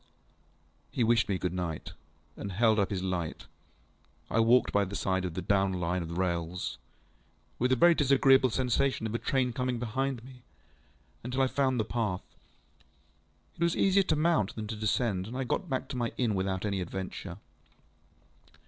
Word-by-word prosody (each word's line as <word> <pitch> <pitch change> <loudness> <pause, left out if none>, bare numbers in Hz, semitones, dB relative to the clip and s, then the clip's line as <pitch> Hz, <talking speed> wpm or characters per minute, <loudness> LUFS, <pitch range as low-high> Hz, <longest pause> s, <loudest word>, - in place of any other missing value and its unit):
ŌĆØ - - -37
He 120 - +2
wished 115 -1 +3
me 95 - +1
good 90 -1 -2
night, 85 -4 -4 0.4
and 100 - -6
held 110 +2 +3
up 100 - +1
his 95 -2 -3
light. 90 -4 -3 0.9
I 115 - +2
walked 115 +3 +4
by 100 - +3
the 100 +1 -5
side 95 -1 0
of 85 -3 -4
the 95 - -3
down 95 0 +2
Line 90 0 -1
of 85 +1 -5
rails 85 -1 -2 0.8
(with 125 +2 +2
a - - +5
very 170 +7 +6
disagreeable 135 -3 +4
sensation 130 0 0
of 110 - -3
a 115 - -1
train 130 -3 0
coming 125 0 -1
behind 120 +1 -2
me) 130 0 -13 0.8
until 125 +2 0
I - - +5
found 130 -1 +1
the 110 - +1
path. 105 -5 -2 1.3
It - - -15
was 170 0 +2
easier 195 0 +4
to 175 - +1
mount 155 - +1
than 110 - -4
to 110 - -3
descend, 105 -2 0
and 125 +3 -6
I 135 - -1
got 170 +8 -2
back 130 -2 -2
to 140 - -5
my 120 -1 -1
inn 120 -4 +1
without 95 0 -1
any 100 -2 -1
adventure. 95 +1 -6
110 Hz, 180 wpm, -30 LUFS, 95-130 Hz, 1.3 s, very